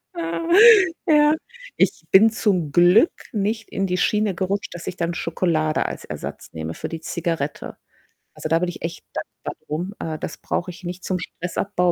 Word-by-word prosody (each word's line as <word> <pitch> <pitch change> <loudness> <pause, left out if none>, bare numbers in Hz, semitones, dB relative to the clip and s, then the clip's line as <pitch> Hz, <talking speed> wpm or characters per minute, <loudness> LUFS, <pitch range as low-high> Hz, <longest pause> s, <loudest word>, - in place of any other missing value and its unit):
Ja, 335 -1 -3 0.6
ja. 300 -2 +5 0.4
Ich - - +1
bin 215 +4 +7
zum 185 -9 0
Glück 180 - +6 0.2
nicht 215 +1 -2
in 195 - -1
die 180 -1 -1
Schiene 210 0 +1
gerutscht, 190 +2 -2
dass 170 - -8
ich 180 - -4
dann 170 0 -1
Schokolade 160 -2 0
als - - -7
Ersatz - - -7
nehme 80 0 -4
für - - -5
die 165 - -6
Zigarette. 165 -3 -3 0.6
Also, - - -5
da 165 - +3
bin 180 0 0
ich 175 - -8
echt 165 0 -5
dankbar - - -6
drum. 175 +6 -3
Äh, 160 -1 -4
das - - -5
brauche 180 - -3
ich 180 - -14
nicht. 180 +1 -6
Zum 185 -1 -1
Stressabbau 180 +1 -1
180 Hz, 175 wpm, -22 LUFS, 165-205 Hz, 0.6 s, bin